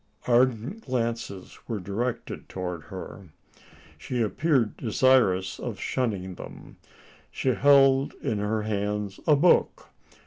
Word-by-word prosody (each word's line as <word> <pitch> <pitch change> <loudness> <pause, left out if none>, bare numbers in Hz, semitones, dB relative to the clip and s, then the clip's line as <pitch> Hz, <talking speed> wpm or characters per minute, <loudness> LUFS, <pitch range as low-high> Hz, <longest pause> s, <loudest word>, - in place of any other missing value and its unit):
Ardent 125 - +1
glances 115 -6 -3
were 115 -3 -3
directed 115 +6 -4
towards 90 -3 -5
her. 95 -1 -9 0.7
She 125 - -4
appeared 120 +1 +1
desirous 110 -6 +2
of - - -5
shunning 100 -8 -2
them. - - -11 0.5
She 130 - -2
held 135 +1 +4
in 105 - -3
her 105 +1 -1
hands 105 -1 -2
a 150 - +6
book. 165 +5 +2
115 Hz, 110 wpm, -26 LUFS, 100-130 Hz, 0.7 s, a